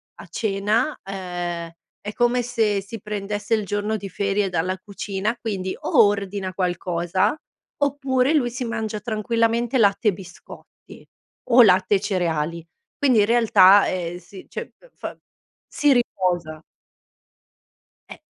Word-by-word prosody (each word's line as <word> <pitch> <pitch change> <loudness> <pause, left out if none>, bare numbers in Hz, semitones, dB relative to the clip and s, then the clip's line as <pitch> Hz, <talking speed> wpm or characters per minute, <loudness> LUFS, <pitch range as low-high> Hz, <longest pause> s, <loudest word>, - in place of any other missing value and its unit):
a - - -12
cena, 215 +6 0
ehm, 175 -3 -5 0.3
è 205 +1 -6
come 240 +1 +2
se 225 -4 0
si 210 +3 -9
prendesse 205 +1 -4
il 215 -2 +1
giorno 205 +2 -2
di 200 -2 -6
ferie 200 +1 -1
dalla 185 +1 -1
cucina, 200 +2 -4
quindi 190 -4 -3
o - - +4
ordina 200 -2 -3
qualcosa 180 +1 0 0.5
oppure 275 -1 +1
lui 270 -6 +2
si 245 +1 -4
mangia 220 -2 -3
tranquillamente 230 +2 0
latte 210 0 +3
e - - -1
biscotti 180 -1 -14 0.4
o 245 +1 +8
latte 190 0 +4
e - - +2
cereali. 170 -4 -2 0.3
Quindi 255 -6 +3
in 205 - +5
realtà, 210 -4 +6
ehm, 175 -1 -3
si 190 +1 -13
cioè - - -7
f - - -21
fa, - - -8 0.5
si 290 -2 +2
riposa. 175 -9 -1 1.5
Eh. - - -9
205 Hz, 135 wpm, -22 LUFS, 185-230 Hz, 1.5 s, o